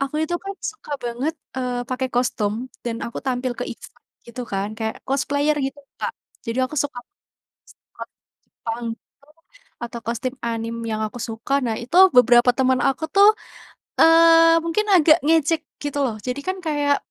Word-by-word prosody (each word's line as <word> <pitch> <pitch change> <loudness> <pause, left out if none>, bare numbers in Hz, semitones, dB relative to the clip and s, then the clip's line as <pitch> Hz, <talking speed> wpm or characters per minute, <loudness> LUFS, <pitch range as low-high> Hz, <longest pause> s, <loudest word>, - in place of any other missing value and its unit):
Aku 275 +1 -3
itu 345 +2 -2
kan 395 - -4
suka 425 -8 -7
banget, 245 +6 -2 0.2
eee, 245 -1 -3
pakai 260 0 -2
kostum 240 -4 0 0.3
dan 230 -1 -2
aku 235 - -6
tampil 250 -1 -1
ke - - -2
event - - -14 0.3
gitu 235 +1 -8
kan 195 +1 -1
kayak 220 0 -3
cosplayer 285 +2 +1
gitu 270 +1 -7 0.2
Kak. - - -3 0.3
Jadi 230 +2 -3
aku 305 +4 -6
suka, 275 -3 -1 0.9
skot - - -9 0.6
pang 230 +1 -3 0.3
tuh 285 +2 -24 0.5
atau 235 0 -5
kostum 235 +2 -2
anime 230 0 -3
yang 215 - -2
aku 230 +3 -9
suka, 225 +4 -6
nah 220 -1 -1
itu 255 +9 -3 0.2
beberapa 245 0 +6
teman 260 -1 +2
aku 275 +4 -2
tuh, 400 +1 +8 0.7
eee, 330 0 +7
mungkin 425 +6 0
agak 320 -2 +6
ngejek 320 0 +3 0.2
gitu 290 -1 -3
loh, 225 -4 -2
jadi 250 +3 -2
kan 375 0 -1
kayak, 290 -2 +2
260 Hz, 160 wpm, -22 LUFS, 235-305 Hz, 0.9 s, tuh